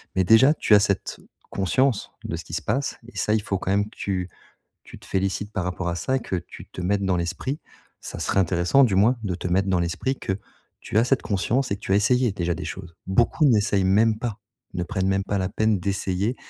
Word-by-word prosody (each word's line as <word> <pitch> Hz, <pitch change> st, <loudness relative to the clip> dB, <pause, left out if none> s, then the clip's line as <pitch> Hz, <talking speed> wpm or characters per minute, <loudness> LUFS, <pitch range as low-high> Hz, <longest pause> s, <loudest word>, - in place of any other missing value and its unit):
Mais 95 Hz, -, +3 dB
déjà, 115 Hz, +9 st, +6 dB
tu 105 Hz, -, +4 dB
as -, -, +7 dB
cette 100 Hz, -1 st, -1 dB, 0.3 s
conscience 110 Hz, +5 st, +1 dB
de -, -, -3 dB
ce -, -, -7 dB
qui -, -, -11 dB
se -, -, -1 dB
passe. 135 Hz, +1 st, -1 dB
Et 120 Hz, -, -13 dB
ça, 105 Hz, -, +1 dB
il 110 Hz, -, +2 dB
faut 95 Hz, -, -1 dB
quand 95 Hz, -, -2 dB
même 100 Hz, +1 st, +2 dB
que -, -, -21 dB
tu 95 Hz, -2 st, -3 dB, 0.6 s
tu -, -, -12 dB
te -, -, -16 dB
félicites 95 Hz, +2 st, -2 dB
par 95 Hz, -, -2 dB
rapport 90 Hz, 0 st, -3 dB
à 85 Hz, -, -1 dB
ça 130 Hz, +11 st, 0 dB
que 115 Hz, -, -5 dB
tu 85 Hz, -, -9 dB
te -, -, -9 dB
mettes 100 Hz, +2 st, 0 dB
dans 95 Hz, -1 st, +1 dB
l'esprit. 90 Hz, -, -3 dB, 0.4 s
Ça -, -, -7 dB
serait 95 Hz, -, +1 dB
intéressant 90 Hz, +8 st, +3 dB
du 105 Hz, -6 st, +1 dB
moins 110 Hz, +6 st, +4 dB
de 95 Hz, -3 st, -1 dB
te 90 Hz, -, -5 dB
mettre 95 Hz, +2 st, +1 dB
dans 95 Hz, -2 st, +2 dB
l'esprit 85 Hz, +10 st, -1 dB
que 95 Hz, -, -2 dB, 0.5 s
tu 105 Hz, -, -1 dB
as 115 Hz, -, +5 dB
cette 130 Hz, +1 st, +1 dB
conscience 120 Hz, +6 st, 0 dB
et 100 Hz, -, 0 dB
que -, -, -21 dB
tu 100 Hz, -, -2 dB
as -, -, +5 dB
essayé 120 Hz, +3 st, +3 dB
déjà 85 Hz, -3 st, -1 dB
des -, -, -6 dB
choses. 85 Hz, +1 st, -8 dB
Beaucoup 120 Hz, -, +2 dB
n'essayent 105 Hz, -5 st, +3 dB
même 110 Hz, +3 st, +3 dB
pas, 115 Hz, -3 st, -4 dB, 0.4 s
ne 90 Hz, -, -1 dB
prennent 95 Hz, 0 st, -2 dB
même 95 Hz, 0 st, +1 dB
pas 100 Hz, 0 st, -1 dB
la 95 Hz, -1 st, -1 dB
peine 110 Hz, 0 st, +1 dB
d'essayer 100 Hz, +4 st, -1 dB
100 Hz, 240 wpm, -24 LUFS, 95-115 Hz, 0.6 s, as